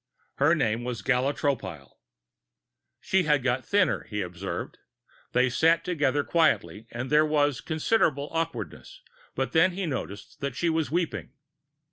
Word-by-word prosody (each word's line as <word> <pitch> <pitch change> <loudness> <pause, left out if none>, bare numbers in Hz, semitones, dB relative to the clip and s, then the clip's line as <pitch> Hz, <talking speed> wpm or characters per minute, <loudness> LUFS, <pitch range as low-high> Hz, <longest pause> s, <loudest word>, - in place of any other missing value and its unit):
Her 145 +4 +4
name 120 -5 0
was 120 -2 -4
Gala 130 +1 +2
Tropile. 95 - -3 1.0
She 190 - +2
had 150 -3 +2
got 130 0 0
thinner, 200 -2 +1
he 105 -1 -3
observed. 90 +2 -6 0.5
They 125 +1 +4
sat 165 +6 +3
together 145 -5 +1
quietly 115 - +1
and 120 +2 -5
there 150 +1 +6
was 145 -4 +1
considerable 155 -3 +1
awkwardness, 165 - -4 0.3
but - - -1
then 175 +3 +4
he 190 +1 -3
noticed 115 - -5
that 140 -3 -3
she 170 +5 +1
was 160 -4 0
weeping. 165 -4 -2
145 Hz, 140 wpm, -27 LUFS, 120-165 Hz, 1.0 s, there